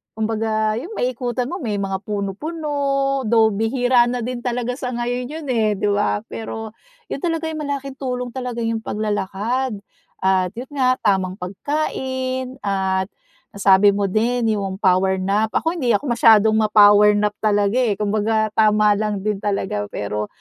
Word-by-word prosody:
kumbaga 220 0 -1
yun 405 - -8
maiikutan 245 -1 -2
mo, 360 - -5
may 220 -7 -2
mga 195 -1 -2
puno-puno, 275 - -1
though 220 -1 +4
bihira 240 +3 +2
na 245 -1 -2
din 250 0 -4
talaga 245 0 -2
sa 250 -3 -3
ngayon 245 +1 -2
yun, 310 0 -7
eh, 215 -3 +1
'di 205 +1 0
ba? 205 +1 0
Pero 220 -1 -6 0.4
yun - - -3
talaga 325 -1 -2
yung 310 - -5
malaking 275 -1 -5
tulong 250 -2 -3
talaga 250 -2 -4
yung 225 0 -1
paglalakad 215 +3 -2 0.4
at 190 -1 +1
yun 245 +3 -8
nga 255 -1 +2
tamang 190 -2 0
pagkain 260 +4 -3
at 190 -1 -1 0.5
nasabi 200 0 +5
mo 205 - 0
din 230 +1 +1
yung 195 -1 -3
power 190 -1 +2
nap, 200 +3 0
ako 325 - +1
hindi 245 -6 +2
ako 250 +3 -2
masyadong 220 -2 +5
ma-power 210 -1 +6
nap 210 0 +1
talaga 205 +2 +2
eh, 225 -6 +1
kumbaga 215 +1 0
tama 210 -1 +4
lang 210 -2 -2
din 210 -2 -1
talaga 190 - -2
pero 105 +1 -4
220 Hz, 155 wpm, -21 LUFS, 205-250 Hz, 0.5 s, ma-power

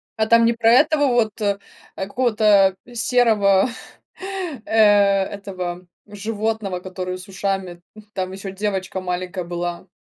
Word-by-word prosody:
А 220 - +1
там 230 +1 +5
не 235 - +3
про 225 0 +2
этого 290 +3 +4
вот, 230 -3 +1
э, 200 -1 0 0.4
э, 190 - -4
какого-то 210 -4 +3 0.2
серого, 225 -4 +3 1.0
э, - - -10
этого 200 -4 +2 0.2
животного, 210 -2 -3
который 185 0 -5
с 180 - -11
ушами? 190 -2 -3
М. 215 - -13
Там 185 -1 -3
ещё 195 0 -7
девочка 190 -2 -3
маленькая 180 0 -4
была. 175 +1 -5
200 Hz, 130 wpm, -21 LUFS, 185-220 Hz, 1.0 s, там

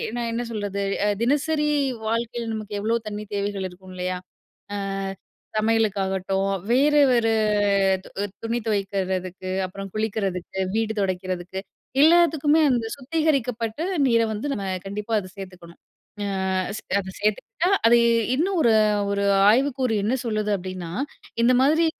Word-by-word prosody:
நான் 235 -1 -2
என்ன 235 +1 -1
சொல்றது, 205 -2 -3 0.2
அ - - +3
தினசரி 295 +4 +1 0.4
வாழ்க்கையில 230 +1 -2
நமக்கு 215 -1 -5
எவ்ளோ 225 +2 +1
தண்ணி 210 0 -5
தேவைகள் 200 -1 -2
இருக்கும் 185 +1 -13
இல்லயா! 180 0 -2 0.6
ஆ - - -2 0.8
சமையலுக்காகட்டும், 195 -3 +1 0.2
வேற, 285 +4 +4 0.2
வேற 235 -2 +3 0.8
து - - -11 0.3
துணி 230 +1 -1
துவைக்கிறதுக்கு, 190 -3 -2
அப்புறம் 195 +2 -7
குளிக்கிறதுக்கு, 195 -4 -2 0.2
வீடு 220 0 0
துடைக்கிறதுக்கு. 185 -1 -2 0.4
எல்லாத்துக்குமே 320 -2 +5
அந்த 235 -2 0
சுத்திகரிக்கப்பட்ட 265 -5 -1 0.3
நீர 230 -1 +4
வந்து 215 +7 -4
நம்ம 200 -6 -4 0.2
கண்டிப்பா 210 +3 -4
அத 185 -2 -9
சேர்த்துக்கணும். 180 -3 -10 0.5
ஆ - - -2 0.7
அத 190 -1 -6
சேர்த்துக்கிட்டா, 225 - 0 0.2
அது 235 +1 +6 0.4
இன்னும் 365 +5 0
ஒரு, 230 -4 +4 0.4
ஒரு 200 0 0 0.3
ஆய்வுக்கூறு 260 -1 +1
என்ன 220 +5 +1
சொல்லுது 215 -2 -1
அப்பிடின்னா, 185 -2 -6 0.5
இந்த 245 - +5
மாதிரி 315 +5 +4
215 Hz, 125 wpm, -24 LUFS, 195-245 Hz, 0.8 s, அது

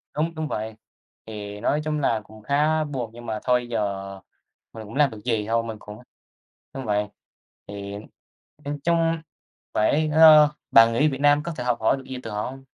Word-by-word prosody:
Đúng, 165 +2 -1
đúng 155 0 -3
vậy, 110 -4 -4 0.5
thì 105 -2 -7
nói 145 +6 +1
chung 150 0 -2
là 115 -6 +1
cũng 110 +1 -15
khá 150 +5 +2
buồn 130 -6 -4
nhưng 120 +1 -11
mà 110 -2 -3
thôi 125 -1 +1
giờ 100 -3 -3 0.5
mình 110 - -8
cũng 105 +1 -11
làm 145 -1 +4
được 110 - -9
gì, 110 -4 0
thôi 115 +1 +1
mình 110 -1 -6
cũng 105 +1 -11 0.7
đúng 135 -1 -6
vậy. 105 -1 0 0.6
Thì 100 0 -7 0.7
nhìn 145 0 -4
chung 165 -1 +2 0.6
phải 150 +9 +2
ơ, 155 -1 +8 0.2
bạn 115 0 +7
nghĩ 145 +7 +3
Việt 135 -2 -4
Nam 145 0 +4
có 170 - -4
thể 125 - -4
học 120 -2 0
hỏi 110 - +2
được 135 - -10
gì 130 - -6
từ 115 - -7
họ 105 0 -3
hông? 135 +3 -7
120 Hz, 195 wpm, -24 LUFS, 110-150 Hz, 0.7 s, ơ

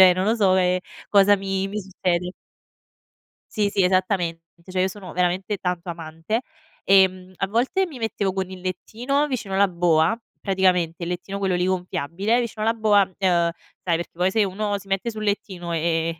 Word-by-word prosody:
cioè 185 -1 +9
non 185 +1 0
lo 225 - +3
so, 195 -4 +4
ehm, 180 0 +3 0.3
cosa 205 0 +6
mi 195 0 -2
mi 210 +1 -3
succede. 180 -1 -2 1.2
Sì, 210 -1 +2
sì 195 -1 +1
esattamente. 180 -3 +1 0.2
Cioè 185 -1 -1
io 190 - +3
sono 190 -2 -9
veramente 180 +3 0
tanto 180 -1 -3
amante. 165 +6 -3 0.4
Ehm, 185 -1 +4
a 195 - -1
volte 245 - +1
mi 295 - -10
mettevo 210 -4 -1
con 190 -1 -2
il 185 -1 -8
lettino 235 +10 -1
vicino 210 -8 -3
la 200 0 +5
boa, 170 +3 +2 0.2
praticamente 180 -3 +1
il 170 - -3
lettino 195 +2 -4
quello 190 -2 +1
lì 180 0 +1
gonfiabile 185 +4 0
vicino 220 -2 -4
la 225 - +3
boa, 215 -3 +4 0.2
ehm 175 -3 +2 0.4
sai 170 - +3
perché 170 - -4
poi 180 +2 +1
se 220 0 +3
uno 205 +1 -1
si 200 0 -13
mette 195 +4 -1
sul 215 -1 -6
lettino 190 -4 -2
e 165 0 0
e - - -29
190 Hz, 185 wpm, -23 LUFS, 180-205 Hz, 1.2 s, cioè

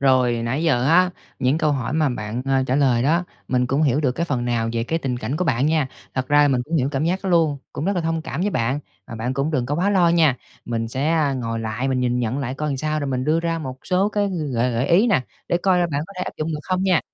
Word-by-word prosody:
rồi 130 -3 +4
nãy 130 +7 -1
giờ 130 -7 +2
á, 180 +3 +5 0.3
những 130 +5 +2
câu 155 -3 +2
hỏi 130 -1 -2
mà 155 -2 +2
bạn, 115 0 -4
ờ, 135 -1 +2
trả 130 - +1
lời 125 -4 +3
đó, 165 +6 +2 0.2
mình 125 -1 +1
cũng 135 +5 +1
hiểu 140 -1 +2
được 130 -5 +1
cái 170 +5 -2
phần 125 -5 -1
nào 115 -2 0
về 115 0 -1
cái 165 +6 -1
tình 130 -5 -2
cảnh 125 +5 -3
của 180 - 0
bạn 135 -2 +1
nha. 155 -3 +2 0.3
Thật 130 0 -2
ra 145 0 +5
là 145 - +4
mình 125 -2 +1
cũng 165 +2 -1
hiểu 135 -1 +1
cảm 135 +3 0
giác 185 +3 0
đó 190 - -2
luôn, 160 -5 +3
cũng 150 - -4
rất 200 - +1
là - - +1
thông 165 0 -1
cảm 150 +2 -4
với 205 - +1
bạn, 130 - 0 0.3
và 115 - -8
bạn 120 +3 -3
cũng 140 +3 0
đừng 130 -6 0
có 145 - -1
quá 185 +5 +1
lo 180 -4 +4
nha. 160 -6 +4 0.3
Mình 115 -1 -2
sẽ, 135 +5 -2
a, 155 -4 +2
ngồi 115 -3 -3
lại 110 +4 -2
mình 130 -1 0
nhìn 125 0 +1
nhận 120 +3 -1
lại 130 -1 -3
coi 150 +2 -3
làm 140 - -1
sao 155 +2 -1
rồi 145 - -2
mình 130 -1 -1
đưa 160 +2 +2
ra 165 -1 -1
một 130 -4 -6
số 190 +3 +2
cái 205 -1 0 0.2
gợi 120 +1 +1
gợi 120 +4 0
ý 195 +8 +4
nè, 130 - +3 0.3
để 175 - +2
coi 185 0 +2
là 175 - +2
bạn 140 - -1
có 200 - -12
thể - - -1
áp - - -5
dụng 155 +1 -2
được 150 - -4
không 185 0 -1
nha. 185 -4 +3
140 Hz, 300 wpm, -22 LUFS, 125-165 Hz, 0.3 s, á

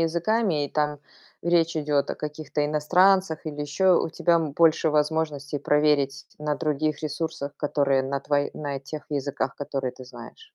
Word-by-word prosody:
языками, 170 0 +1
и - - -4
там 150 -1 0 0.4
речь 170 -1 +2
идёт 150 -2 +1
о - - -2
каких-то 150 0 -3
иностранцах 180 +3 +3
или 150 -1 -5
ещё, 180 +5 +3
у - - -1
тебя, 170 +1 +2
м, 160 -4 0
больше 165 0 +4
возможностей 150 -2 0
проверить 145 -1 +1
на 150 0 -1
других 155 0 -1
ресурсах, 150 -1 -3
которые 140 -2 +1
на 135 +1 -2
тво 145 +1 0 0.2
на, 145 -2 -4
э, 135 - -6
тех 150 +2 -8
языках, 140 -2 -2
которые 135 -3 -3
ты 130 - -12
знаешь. 440 - -12
150 Hz, 165 wpm, -25 LUFS, 145-160 Hz, 0.4 s, больше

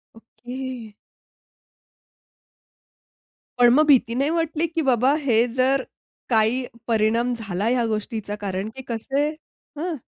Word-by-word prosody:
Okay. 245 0 -8 2.7
पण 240 -1 +7
मग 305 +3 +5
भीती 245 -5 +4
नाही 275 +4 +1
वाटली 330 0 0
की 325 0 -2
बाबा 255 +3 +3
हे 235 -4 +3
जर 265 +1 +2 0.5
काही 230 +3 +2 0.2
परिणाम 230 +2 +2
झाला 215 -2 -2
या 245 -2 +1
गोष्टीचा 215 -1 -3
कारण 195 +1 -3
की 265 - -7
कसं 240 +4 -2
आहे? 310 +2 -4
245 Hz, 115 wpm, -23 LUFS, 220-275 Hz, 2.7 s, पण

